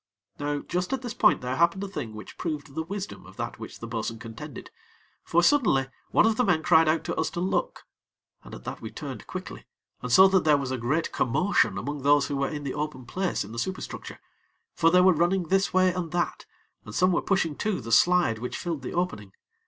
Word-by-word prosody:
Now 145 Hz, 0 st, -2 dB
just 180 Hz, +1 st, -3 dB
at 265 Hz, -1 st, -2 dB
this 240 Hz, -2 st, -4 dB
point 245 Hz, -, +3 dB
there 125 Hz, +1 st, -3 dB
happened 170 Hz, +3 st, +2 dB
a -, -, -3 dB
thing 145 Hz, -, -6 dB
which 110 Hz, -, -10 dB
proved 150 Hz, -4 st, -4 dB
the 160 Hz, -, -2 dB
wisdom 195 Hz, +4 st, -6 dB
of -, -, -15 dB
that -, -, -5 dB
which -, -, -8 dB
the -, -, -6 dB
bo'sun 115 Hz, 0 st, -3 dB
contended; 115 Hz, 0 st, -9 dB, 0.5 s
for, 170 Hz, +1 st, +2 dB
suddenly, 190 Hz, -, +3 dB, 0.2 s
one -, -, +4 dB
of 220 Hz, -1 st, +2 dB
the 250 Hz, -, +3 dB
men 175 Hz, -8 st, +2 dB
cried 160 Hz, -1 st, +5 dB
out 160 Hz, +1 st, +1 dB
to -, -, -3 dB
us -, -, 0 dB
to -, -, -5 dB
look, 195 Hz, -, -1 dB, 0.6 s
and -, -, -10 dB
at -, -, -12 dB
that -, -, -6 dB
we -, -, -6 dB
turned -, -, -8 dB
quickly, -, -, -7 dB, 0.3 s
and -, -, -4 dB
saw 190 Hz, 0 st, +8 dB
that 190 Hz, -2 st, +3 dB
there 150 Hz, -2 st, +5 dB
was 135 Hz, -2 st, -3 dB
a 130 Hz, -, -1 dB
great 140 Hz, +8 st, 0 dB
commotion 180 Hz, +11 st, +1 dB
among 145 Hz, 0 st, -4 dB
those 145 Hz, +1 st, +4 dB
who 145 Hz, -, -2 dB
were 140 Hz, 0 st, 0 dB
in 150 Hz, -1 st, -5 dB
the 140 Hz, -, -3 dB
open 145 Hz, -4 st, -4 dB
place 185 Hz, +9 st, -2 dB
in -, -, -10 dB
the 115 Hz, -, -5 dB
superstructure; 185 Hz, +9 st, -5 dB, 0.5 s
for 165 Hz, -, +3 dB
they 180 Hz, +2 st, +5 dB
were 185 Hz, 0 st, +6 dB
running 175 Hz, +1 st, +1 dB
this 195 Hz, +1 st, +2 dB
way 185 Hz, -1 st, +3 dB
and 175 Hz, -3 st, -4 dB
that, 175 Hz, 0 st, -2 dB, 0.4 s
and 105 Hz, -, -9 dB
some 185 Hz, +1 st, +4 dB
were 175 Hz, -, +1 dB
pushing 165 Hz, -6 st, 0 dB
to 210 Hz, -2 st, -1 dB
the 115 Hz, -2 st, -7 dB
slide 175 Hz, -2 st, +4 dB
which 125 Hz, +2 st, -4 dB
filled 165 Hz, -5 st, -4 dB
the 130 Hz, -, -6 dB
opening. 105 Hz, -, -2 dB
165 Hz, 230 wpm, -26 LUFS, 135-185 Hz, 0.6 s, saw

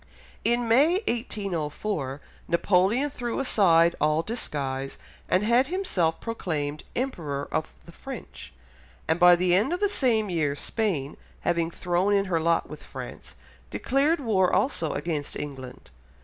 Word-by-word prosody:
In 240 Hz, 0 st, +1 dB
May 275 Hz, +9 st, +5 dB
1804, 175 Hz, -, -2 dB, 0.3 s
Napoleon 195 Hz, +10 st, +2 dB
threw 240 Hz, -1 st, -3 dB
aside 170 Hz, -10 st, +4 dB
all 155 Hz, +2 st, +2 dB
disguise, 135 Hz, -, -3 dB, 0.3 s
and 185 Hz, -, +3 dB
had 240 Hz, +4 st, +3 dB
himself 200 Hz, -, 0 dB
proclaimed 155 Hz, -10 st, -3 dB
Emperor 155 Hz, -, -3 dB
of 65 Hz, +2 st, -2 dB
the -, -, -12 dB
French, -, -, -9 dB, 0.6 s
and 160 Hz, +2 st, +1 dB
by 175 Hz, 0 st, +8 dB
the 175 Hz, 0 st, +2 dB
end 205 Hz, -, +3 dB
of 355 Hz, -, -1 dB
the 410 Hz, -, +3 dB
same 240 Hz, -, +1 dB
year 150 Hz, -4 st, 0 dB
Spain, 155 Hz, -, -2 dB, 0.2 s
having 170 Hz, -1 st, 0 dB
thrown 180 Hz, +3 st, 0 dB
in 200 Hz, 0 st, +2 dB
her 175 Hz, -4 st, 0 dB
lot 165 Hz, +1 st, +1 dB
with -, -, -9 dB
France, -, -, -9 dB, 0.3 s
declared 290 Hz, +5 st, +1 dB
war 200 Hz, -8 st, +2 dB
also 170 Hz, -, +1 dB
against 155 Hz, -4 st, -3 dB
England. 130 Hz, -3 st, -8 dB
180 Hz, 135 wpm, -26 LUFS, 155-235 Hz, 0.6 s, by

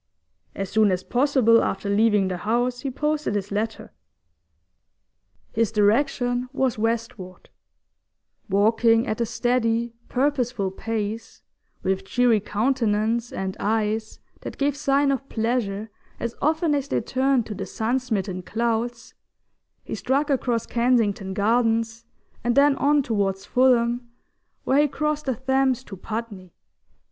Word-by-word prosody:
As 195 Hz, -1 st, -4 dB
soon 215 Hz, -1 st, +4 dB
as 185 Hz, 0 st, -1 dB
possible 250 Hz, -3 st, +3 dB
after 195 Hz, -, -2 dB
leaving 205 Hz, -1 st, +3 dB
the 185 Hz, -1 st, -3 dB
house 240 Hz, +5 st, 0 dB
he 270 Hz, -, -3 dB
posted 300 Hz, -3 st, -1 dB
his 205 Hz, 0 st, -3 dB
letter. 220 Hz, +2 st, -3 dB, 1.6 s
His 225 Hz, -2 st, +1 dB
direction 245 Hz, +3 st, +1 dB
was 265 Hz, -4 st, 0 dB
westward; 225 Hz, -5 st, -3 dB, 1.0 s
walking 225 Hz, +3 st, +3 dB
at 215 Hz, +2 st, -2 dB
a 235 Hz, -, +1 dB
steady, 235 Hz, -1 st, 0 dB, 0.2 s
purposeful 250 Hz, -7 st, 0 dB
pace, 220 Hz, +2 st, -4 dB, 0.4 s
with 190 Hz, 0 st, 0 dB
cheery 240 Hz, +2 st, +2 dB
countenance 225 Hz, +1 st, 0 dB
and 190 Hz, 0 st, -4 dB
eyes 220 Hz, +1 st, -1 dB, 0.2 s
that -, -, -8 dB
gave 280 Hz, 0 st, +1 dB
sign 280 Hz, -1 st, +2 dB
of 275 Hz, 0 st, -3 dB
pleasure 220 Hz, -2 st, -2 dB, 0.3 s
as 235 Hz, 0 st, -3 dB
often 315 Hz, +1 st, +2 dB
as 280 Hz, -1 st, -1 dB
they -, -, 0 dB
turned 260 Hz, -2 st, +1 dB
to 215 Hz, -, -6 dB
the 195 Hz, -1 st, -6 dB
sun 230 Hz, +7 st, -1 dB
smitten 200 Hz, -7 st, -3 dB
clouds, 235 Hz, +3 st, -2 dB, 0.7 s
he -, -, -7 dB
struck 285 Hz, +3 st, 0 dB
across 245 Hz, -4 st, 0 dB
Kensington 225 Hz, -6 st, +1 dB
Gardens, 225 Hz, +1 st, +1 dB, 0.4 s
and 240 Hz, 0 st, +1 dB
then 280 Hz, 0 st, +5 dB
on 290 Hz, 0 st, +3 dB
towards 200 Hz, -4 st, -1 dB
Fulham, 240 Hz, -1 st, +2 dB, 0.5 s
where 270 Hz, -, +3 dB
he 300 Hz, -, +3 dB
crossed 300 Hz, +1 st, -2 dB
the 260 Hz, -, +1 dB
Thames 265 Hz, 0 st, +1 dB
to 205 Hz, -, -9 dB
Putney. 205 Hz, -2 st, -6 dB
230 Hz, 130 wpm, -24 LUFS, 210-255 Hz, 1.6 s, then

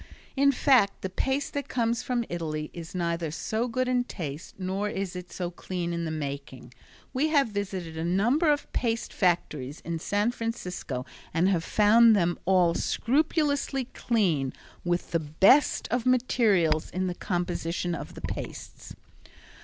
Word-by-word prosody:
In 280 Hz, +1 st, +5 dB
fact 255 Hz, -6 st, +3 dB
the 190 Hz, -, -3 dB
paste 270 Hz, +8 st, -1 dB
that 285 Hz, -1 st, -3 dB
comes 235 Hz, -1 st, 0 dB
from 245 Hz, -2 st, -1 dB
Italy 155 Hz, -3 st, -4 dB
is 170 Hz, +1 st, -8 dB
neither 170 Hz, -2 st, -1 dB
so 220 Hz, +9 st, -2 dB
good 255 Hz, +2 st, -1 dB
in 250 Hz, -1 st, +2 dB
taste, 155 Hz, -, -7 dB
nor 195 Hz, +2 st, -2 dB
is 190 Hz, -2 st, -4 dB
it 180 Hz, -1 st, -7 dB
so 175 Hz, -1 st, -4 dB
clean 175 Hz, -1 st, -4 dB
in 170 Hz, 0 st, -2 dB
the -, -, -2 dB
making. 140 Hz, -5 st, -6 dB, 0.4 s
We 275 Hz, +4 st, +2 dB
have 285 Hz, -6 st, +3 dB
visited 195 Hz, -5 st, -4 dB
a 160 Hz, -, -3 dB
number 235 Hz, -, +2 dB
of 290 Hz, -1 st, 0 dB
paste 230 Hz, -2 st, -1 dB
factories 155 Hz, -6 st, 0 dB
in 165 Hz, -1 st, -4 dB
San 205 Hz, +7 st, +1 dB
Francisco 180 Hz, -, -4 dB, 0.3 s
and 175 Hz, +3 st, +3 dB
have 175 Hz, -4 st, +1 dB
found 220 Hz, +4 st, +6 dB
them 175 Hz, -3 st, +1 dB
all 180 Hz, -2 st, +4 dB
scrupulously 285 Hz, -, +1 dB
clean, 170 Hz, -, +1 dB, 0.3 s
with 175 Hz, 0 st, -1 dB
the 165 Hz, -, +2 dB
best 190 Hz, -, +4 dB
of 245 Hz, 0 st, 0 dB
materials 210 Hz, -11 st, +3 dB
in 185 Hz, +1 st, -2 dB
the 180 Hz, -, -1 dB
composition 175 Hz, -1 st, -2 dB
of -, -, -6 dB
the -, -, -9 dB
pastes. -, -, -7 dB
185 Hz, 155 wpm, -27 LUFS, 170-240 Hz, 0.4 s, found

